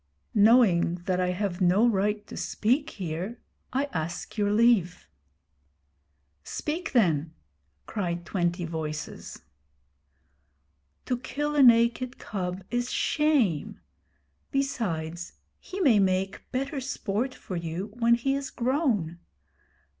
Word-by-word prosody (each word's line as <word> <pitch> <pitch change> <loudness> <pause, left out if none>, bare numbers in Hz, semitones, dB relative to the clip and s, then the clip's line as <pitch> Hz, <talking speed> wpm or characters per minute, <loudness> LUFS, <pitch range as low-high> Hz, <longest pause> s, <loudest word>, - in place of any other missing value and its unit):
'Knowing 205 -6 +5
that 185 -1 0
I 180 - +1
have 180 0 -2
no 190 +6 +4
right 210 -1 0
to - - -10
speak 265 +8 0
here, 185 - -5 0.3
I 270 +2 +1
ask 165 +1 -4
your 205 -2 +1
leave.' 210 -5 +3 1.4
'Speak 315 - -4
then,' 165 - +2 0.5
cried 175 -5 -3
twenty 175 -1 -1
voices. 155 -2 -6 1.6
'To 250 - 0
kill 295 +4 -3
a 290 - +5
naked 240 0 +4
cub 185 -2 -4
is 245 0 -1
shame. 270 - +1 0.7
Besides, 175 - -2 0.3
he 390 - -7
may 260 - +5
make 190 0 0
better 275 +2 -2
sport 250 -1 -2
for 185 - -7
you 170 +4 -4
when 235 0 +5
he 270 +3 0
is 275 0 -3
grown. 235 - 0
210 Hz, 110 wpm, -27 LUFS, 175-255 Hz, 1.6 s, Knowing